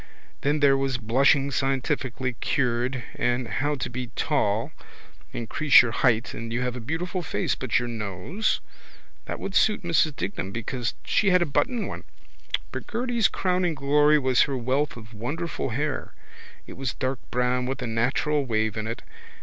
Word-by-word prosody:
Then 145 +2 +1
there 140 -1 +6
was 135 -2 0
blushing 135 +4 +3
scientifically 130 -1 -1
cured 125 0 0
and 120 0 0
how 145 +5 -1
to 130 - -3
be 125 0 -5
tall - - 0 0.6
increase 135 +4 +5
your 120 - -2
height 115 0 +2
and 115 0 -6
you 120 +2 -1
have 125 -1 -1
a - - -5
beautiful 165 +9 -3
face 165 - -1
but 130 -4 0
your 120 - 0
nose? 115 - -2 0.6
That - - -5
would 195 - -5
suit 210 -1 +3
Mrs 160 -3 +2
Dignam 95 +1 -3
because 120 +2 -3
she 210 - +3
had 180 -1 +5
a - - -1
button 220 - 0
one. - - -6 0.7
But - - -6
Gerty's 235 -2 +1
crowning 180 -3 0
glory 150 +2 +4
was 130 -3 +3
her 135 -2 +1
wealth 130 +3 0
of 110 -1 -12
wonderful 145 +8 -3
hair. 140 +4 -3 0.5
It - - -9
was 135 -1 -3
dark 130 -1 -2
brown 125 0 +1
with 135 - -3
a - - -1
natural 125 +6 +1
wave 110 -3 0
in 110 0 -2
it. 115 +2 -5
130 Hz, 165 wpm, -26 LUFS, 120-150 Hz, 0.7 s, there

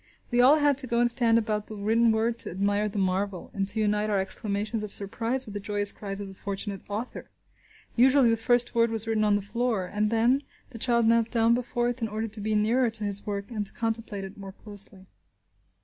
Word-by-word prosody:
We 240 0 +3
all 275 +5 +6
had 290 -2 +2
to 260 - -1
go 235 0 0
and 240 0 +5
stand 230 -1 +3
about 215 -2 -2
the 215 - -8
written 225 +3 +2
word 225 +1 -1
to - - -3
admire 205 +3 0
the 210 - -6
marvel, 190 0 -2
and 195 -1 -2
to 205 +2 +3
unite 210 0 0
our 205 -2 +1
exclamations 205 +3 -2
of 210 -1 -6
surprise 230 +6 +4
with 210 - -10
the 205 - -4
joyous 205 0 +2
cries 195 -1 -6
of 200 - -6
the 195 - -10
fortunate 200 0 -6
author. 215 +5 -6 0.7
Usually, 260 +1 +4
this 230 -1 0
first 240 +1 +2
word 230 -1 +2
was 225 -1 -3
written 220 -1 0
on 210 -1 +3
the 205 - -2
floor, 220 -1 -2
and, 210 +3 -1
then, 235 +5 +2 0.3
the 230 - -10
child 235 -1 +2
knelt 230 0 +3
down 230 -1 +2
before 240 0 -1
it 245 0 -5
in 225 - -1
order 220 +1 -4
to 215 0 -4
be 215 +1 -1
nearer 230 +4 +2
to 220 -1 -4
his 205 0 +1
work 200 +1 -4
and 215 -3 -3
to 200 - -2
contemplate 225 -3 -3
it 195 +1 -10
more 195 -1 -9
closely. 200 -2 -8
215 Hz, 230 wpm, -26 LUFS, 205-235 Hz, 0.7 s, all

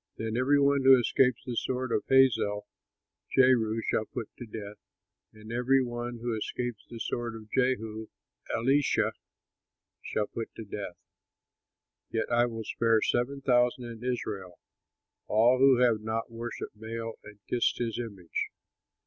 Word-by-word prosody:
Then 110 0 -3
every 135 +4 +3
one 140 0 +3
who 135 0 +8
escapes 125 0 +2
the 125 -2 -4
sword 130 +1 -2
of 105 - +1
Hazael, 115 -6 +4 0.7
Jehu 115 -4 +4
shall 110 - +1
put 110 - -6
to 120 - -7
death; 105 -1 -7 0.5
and 110 +1 -12
every 130 +2 +3
one 120 0 -4
who 120 -2 -1
escapes 120 +1 -4
the 115 - -8
sword 120 0 -3
of 110 -1 -11
Jehu, 110 -4 0 0.4
Elisha 135 +5 +2 0.9
shall 105 - -1
put 115 +2 -6
to 110 - -7
death. 100 -3 -6 1.1
Yet 110 -1 -2
I 120 +1 +4
will 115 -1 -5
spare 115 0 +2
seven 135 +3 0
thousand 125 0 +2
in 115 -1 -8
Israel 105 -7 -3 0.7
all 120 +4 +4
who 135 -1 +6
have 120 -3 +3
not 110 +1 -3
worshipped 115 -2 -6
Baal 115 0 -5
and 105 0 -12
kissed 120 - +1
his 115 -1 -2
image." 100 -8 -4
115 Hz, 145 wpm, -29 LUFS, 110-125 Hz, 1.1 s, who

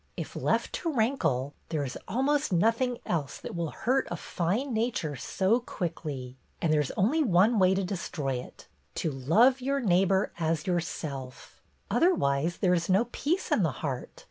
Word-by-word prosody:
If - - -6
left - - 0
to 335 - -1
rankle, 165 - 0 0.2
there 155 -3 -1
is 130 - -5
almost 285 +3 +1
nothing 230 +7 +2
else 150 -6 -2
that - - -7
will 170 -2 -2
hurt 260 - 0
a - - -2
fine 215 +10 -2
nature 220 - -1
so 190 - +1
quickly. 150 - -5 0.2
And 160 -3 +1
there 150 - +4
's 145 - -3
only 255 +12 +3
one 210 +1 +4
way 185 0 +5
to 195 - 0
destroy 165 -8 -3
it, - - -12
— - - -40
to 160 - -1
love 210 - +3
your 275 +2 0
neighbor 195 -3 +2
as 160 -1 0
your 180 -2 +2
self. 140 -6 -7 0.3
Otherwise 165 - +2
there 180 -2 +2
is 170 0 0
no 200 +6 +3
peace 340 +7 -1
in - - +3
the - - +1
heart. - - -4
185 Hz, 175 wpm, -28 LUFS, 155-240 Hz, 0.3 s, way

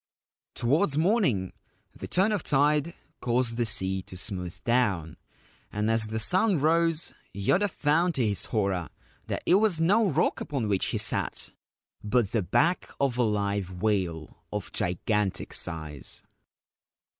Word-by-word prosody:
Towards 145 +5 +1
morning 155 - +1 0.4
the - - -7
turn 190 +4 +2
of 210 -4 0
tide 150 +3 +2 0.2
caused 120 -1 0
the 120 -1 0
sea 95 -2 0
to 90 - -9
smooth 90 -3 -5
down, 100 -10 +1 0.6
and 105 +2 0
as 115 -1 +1
the 110 +1 -3
sun 185 - +2
rose 165 +2 +2 0.2
Yoda 180 - +2
found 165 +2 +1
to 125 -4 +1
his 100 -2 -1
horror 100 -6 -1 0.4
that - - -3
it - - +3
was 200 -4 +3
no 200 +6 +3
rock 160 +2 +1
upon 135 -7 -2
which 100 -2 +1
he - - -1
sat, - - +1 0.5
but 105 -1 +1
the 110 - +1
back 165 - +1
of 135 -3 +1
a - - +5
live 100 -4 -1
whale 90 -7 -1
of - - -4
gigantic 95 +3 -1
size. 75 -5 -4
115 Hz, 145 wpm, -27 LUFS, 100-160 Hz, 0.6 s, a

